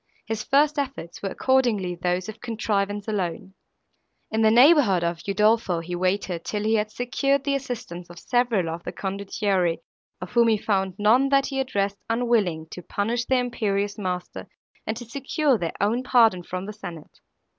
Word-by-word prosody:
His 220 -1 -3
first 295 +2 +3
efforts 270 -11 -5
were 195 - -2
accordingly 235 -8 +1
those 180 +2 -1
of 220 0 -9
contrivance 205 -3 -2
alone. 190 -3 -3 0.8
In 220 - 0
the 220 - +5
neighbourhood 240 - +5
of 170 0 -2
Udolpho, 210 -2 +2
he 175 +2 -5
waited, 185 -1 -1
till 210 -1 -3
he 220 +1 +1
had 215 -1 +1
secured 275 +3 0
the 280 0 0
assistance 235 -10 -5
of 175 - -12
several 240 -4 +1
of 165 +1 -4
the - - -5
condottieri, 195 -3 -1 0.4
of 180 -1 -7
whom 235 -1 +4
he 220 -1 +3
found 195 -3 -1
none, 240 +6 +4
that 275 0 +3
he 270 -1 -3
addressed, 200 -6 -1
unwilling 225 -9 +1
to 180 - -7
punish 230 +7 -2
their 260 -1 +2
imperious 205 -4 -2
master 180 -2 -4 0.4
and 220 - -2
to 240 - -7
secure 275 +1 0
their 170 -2 -3
own 215 +5 +1
pardon 230 -7 +4
from 185 +2 -5
the 210 - -6
senate. 170 -6 -10
210 Hz, 170 wpm, -24 LUFS, 185-245 Hz, 0.8 s, the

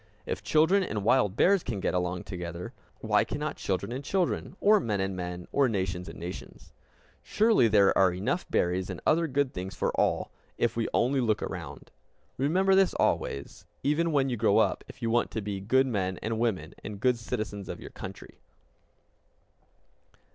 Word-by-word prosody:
If - - -3
children 160 +6 +3
and 105 - -3
wild 105 -3 +3
bears 195 - +4
can 115 -9 -4
get - - -1
along 90 0 -1
together, 90 -1 -6 0.3
why - - +3
cannot - - -4
children - - -2
and 130 +3 -4
children, 180 +2 -1
or 210 +1 +5
men 105 - -1
and 95 0 -1
men, 90 -1 -5
or 140 -2 +3
nations 95 -4 -2
and - - -10
nations? 90 +2 -9 0.5
Surely 215 - +3
there 100 -2 +4
are 95 -1 +5
enough 100 - -2
berries 90 +2 0
and 95 - -5
other 165 +1 +3
good 140 -1 0
things 95 +1 -5
for - - 0
all, - - 0 0.3
if 120 - +1
we 115 -1 0
only 130 +2 +2
look 110 -3 +1
around! - - -7 0.5
Remember 185 +8 +3
this 190 -1 +4
always, 70 0 -1 0.2
even 165 +4 +1
when 140 -3 +2
you 125 -2 -2
grow 105 0 +3
up, 110 - +2
if 130 - -12
you 115 - 0
want 120 +1 +2
to 110 - -3
be 100 -1 -4
good 130 +7 +3
men 95 -7 -1
and 110 0 -2
women, 115 -5 -1
and 105 -2 -7
good 125 +2 +2
citizens 105 -5 -4
of - - -5
your - - -10
country. - - -10
110 Hz, 180 wpm, -28 LUFS, 95-140 Hz, 0.5 s, or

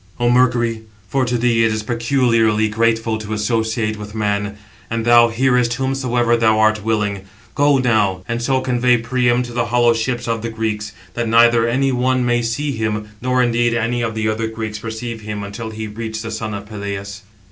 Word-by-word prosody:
"O 120 0 +2
Mercury 120 -2 +2 0.3
(for 130 +5 0
to 120 0 0
thee 115 -1 +2
it 115 - +3
is 110 0 -2
peculiarly 115 -2 +2
grateful 115 0 0
to 110 0 -5
associate 110 0 -1
with 105 +1 -8
man, 105 -1 -1 0.3
and 115 0 -2
thou 120 0 +6
hearest 125 0 +1
whomsoever 125 -2 0
thou 110 -2 +3
art 110 -1 +2
willing), 105 -3 -1 0.3
go 145 -1 +3
now, 105 -7 +1
and 115 +1 -2
so 130 +2 +1
convey 125 -1 +2
Priam 120 +1 +1
to 120 -1 -8
the 120 0 -1
hollow 120 0 +3
ships 120 +2 -2
of 115 -1 -1
the 115 - -3
Greeks, 105 -2 -3 0.2
that 120 -1 -2
neither 115 0 +5
any 135 +3 +1
one 130 0 +1
may 120 0 +2
see 120 +6 -2
him, 110 -3 -3
nor 125 0 +2
indeed 120 -1 +1
any 120 +1 -1
of 115 -1 -2
the 110 0 -1
other 110 +1 -1
Greeks 110 -1 -5
perceive 115 +1 -6
him 105 -1 -5
until 105 +3 -6
he 110 0 -6
reach 110 +1 -5
the 115 - -5
son 110 -1 -4
of 100 0 -7
Peleus." 100 -1 -6
115 Hz, 190 wpm, -19 LUFS, 110-120 Hz, 0.3 s, thou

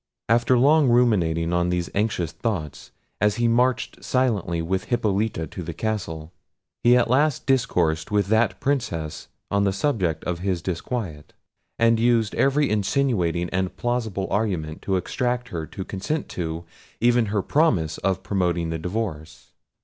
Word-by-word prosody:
After 120 +2 +3
long 145 +2 +5
ruminating 90 -9 +2
on 85 0 +1
these 90 -1 -1
anxious 100 -6 0
thoughts, 85 - -4 0.3
as 105 -1 +3
he 120 0 +1
marched 125 +2 +1
silently 110 -10 0
with 95 +3 -1
Hippolita 105 -6 0
to 90 - -8
the 85 -1 -6
castle, 85 -8 -3 0.5
he 120 +1 +6
at 125 - +3
last 140 +4 +2
discoursed 90 - +1
with 105 -2 +2
that 110 +2 +2
Princess 120 - -2 0.2
on 100 0 +2
the 100 - +2
subject 95 - -1
of 90 -1 -3
his 90 -2 -2
disquiet, 90 -3 -4 0.4
and 115 0 +3
used 115 -2 +2
every 140 +1 +2
insinuating 100 -6 +1
and 95 0 -2
plausible 115 -5 -1
argument 90 -8 -1
to 95 - -1
extract 125 +6 -1
her 80 -7 -4
consent 100 - -4
to, 80 -1 -4 0.4
even 120 -1 +3
her 100 -1 0
promise 95 - +1
of 95 -1 -1
promoting 85 -4 0
the 80 - -3
divorce. 90 -4 -5
100 Hz, 145 wpm, -24 LUFS, 85-120 Hz, 0.5 s, he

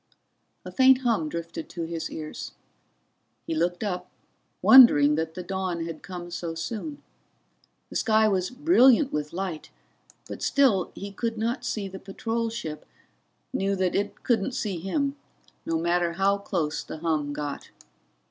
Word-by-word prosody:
A - - -7
faint 265 0 +5
hum 220 -11 +1
drifted 170 0 -6
to 170 - -5
his 165 0 -4
ears. 155 -1 -7 0.9
He - - -3
looked 175 +4 0
up, 180 -3 -3 0.5
wondering 150 - +8
that 160 +1 -2
the 180 - -5
dawn 185 -2 -3
had 165 -2 -7
come 175 -2 -8
so 170 -1 -4
soon. 225 - -5 0.9
The - - -9
sky 220 -1 +3
was 185 -3 0
brilliant 270 -1 +4
with 150 0 -2
light, 180 -3 -5 0.6
but - - -8
still 255 -10 +2
he 200 0 -7
could 225 +3 -3
not 235 +3 -2
see 215 -5 -3
the 190 0 -8
patrol 225 +4 -3
ship, 160 -10 -6 0.7
knew 195 +1 0
that 185 -2 0
it 205 +1 -2
couldn't 240 0 +1
see 205 -8 -2
him, 275 - -1 0.5
no 165 - +1
matter 170 +1 +1
how 195 +3 +2
close 165 -6 -2
the - - -8
hum 155 -3 -1
got. 145 -1 -5
190 Hz, 150 wpm, -26 LUFS, 165-225 Hz, 0.9 s, wondering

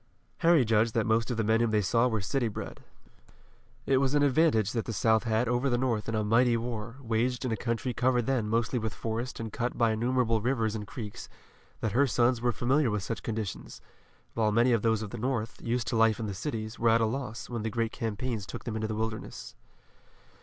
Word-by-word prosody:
Harry 165 -6 +5
judged 110 +1 +2
that 115 - +2
most 115 +2 +1
of 120 - -2
the 115 - +1
men 110 +1 +3
whom 120 -1 +2
they 110 -1 +2
saw 115 +5 +2
were 110 -3 -1
city 120 +5 0
bred. 105 - -7 1.0
It 135 - +3
was 135 +1 +1
an 145 - +4
advantage 135 - +3
that 115 -2 -2
the 115 - -4
South 110 +2 +2
had 115 +1 +1
over 120 +3 +1
the 120 - +2
North 120 -4 -1
in 115 - -1
a 110 - +1
mighty 115 +3 +3
war, 115 -1 -5
waged 120 +3 0
in 125 - -1
a - - +1
country 115 +3 -2
covered 125 0 +1
then 120 -5 0
mostly 115 +2 0
with 110 -1 -4
forest 115 +3 -4
and 115 -2 -5
cut 120 +1 -2
by 115 -2 +3
innumerable 115 0 +1
rivers 115 -2 0
and 105 -2 -5
creeks, 110 -6 -7 0.5
that 110 - 0
her 140 +6 +3
sons 120 -1 +2
were 120 0 +2
familiar 130 +3 +1
with 105 -3 -2
such 115 - -4
conditions, 110 -3 -5 0.5
while 110 -2 +1
many 120 +4 +3
of 115 -3 +3
those 110 -1 +1
of 105 - -7
the 120 - -6
North, 120 -2 -2
used 120 0 -1
to - - -1
life 115 -1 +3
in 115 - -2
the 100 - -3
cities, 110 0 -5
were 115 - +3
at 115 +1 +5
a 115 - +3
loss, 120 0 -4
when 120 -2 -4
the 110 - -2
great 115 0 -1
campaigns 115 -2 -3
took - - -7
them 115 - -4
into 110 0 -2
the 110 - -3
wilderness. 110 0 -5
115 Hz, 230 wpm, -29 LUFS, 110-125 Hz, 1.0 s, Harry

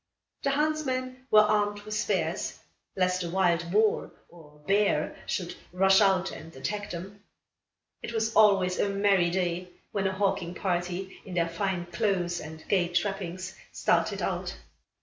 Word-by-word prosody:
The 275 - +1
huntsmen 260 -4 -1
were 215 - +8
armed 205 -1 +1
with 215 +1 -7
spears, 215 0 -1 0.4
lest 185 -1 +1
a 170 - -3
wild 170 -2 +1
boar, 215 +3 +2 0.2
or 155 -3 -16
bear, 200 +3 +2
should - - -2 0.2
rush 190 +2 +5
out 190 -2 +3
and 160 -1 -10
attack 205 +10 -4
them. 195 +4 -8 0.8
It - - -5
was 225 -1 -1
always 195 -4 +5
a 205 - +2
merry 195 -3 +3
day, 180 0 -1 0.2
when 195 -2 0
a - - 0
hawking 190 -3 -1
party, 180 +1 -2
in 185 - -8
their 170 -1 +1
fine 175 +1 -2
clothes 175 0 0
and 160 +1 -10
gay 185 -3 +2
trappings, 185 0 -2 0.2
started - - +1
out. - - -2
190 Hz, 150 wpm, -28 LUFS, 175-205 Hz, 0.8 s, were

